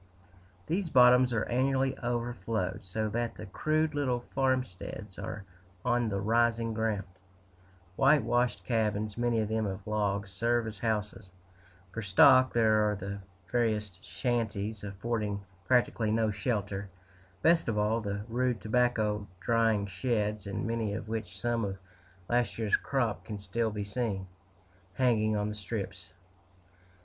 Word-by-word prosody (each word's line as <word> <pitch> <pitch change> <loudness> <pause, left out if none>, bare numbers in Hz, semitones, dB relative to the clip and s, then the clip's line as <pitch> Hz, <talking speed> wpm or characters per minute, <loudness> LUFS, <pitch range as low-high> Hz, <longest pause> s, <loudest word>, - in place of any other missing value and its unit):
These 175 +2 -1
bottoms 125 -1 +6
are 115 -2 0
annually 135 +2 +1
overflowed, 115 -5 -2
so 110 +4 -2
that 115 +2 -2
the - - -8
crude 155 +10 0
little 130 -4 0
farmsteads 130 -8 -2
are 105 - -5 0.4
on 120 -2 +2
the 100 -1 -1
rising 115 +2 +2
ground 110 -2 0 0.9
whitewashed 125 -7 +3
cabins, 105 0 0
many 120 -1 +1
of 105 - -1
them 110 0 0
of 95 0 -5
logs, 100 -2 -1
serve 115 +4 +1
as 110 -2 -6
houses; 105 -3 -2 0.6
for 110 - -3
stock, 130 +6 +6
there 110 -2 +3
are 105 - 0
the 100 +1 -5 0.3
veriest 105 -6 0
shanties, 110 -4 -2
affording 105 0 -2 0.3
practically 120 -3 +2
no 110 0 +2
shelter; 100 -1 -2 0.5
best 165 0 +4
of 110 -2 0
all, 105 +2 +1
the 100 -1 -3
rude 125 0 0
tobacco 110 -3 +1
drying 115 -1 +2
sheds, 105 +1 -1
in 100 - -3
many 115 -3 -1
of 110 - -6
which 110 -1 -4
some 120 -1 0
of 100 -1 -3 0.5
last 120 -3 +1
year's 110 -2 +2
crop 115 -10 -1
can 105 +2 -6
still 105 +3 -1
be 105 -1 -4
seen, 105 -2 -2 0.7
hanging 110 -3 +2
on 105 0 0
the - - -4
strips. 100 -3 -6
110 Hz, 140 wpm, -30 LUFS, 105-120 Hz, 0.9 s, bottoms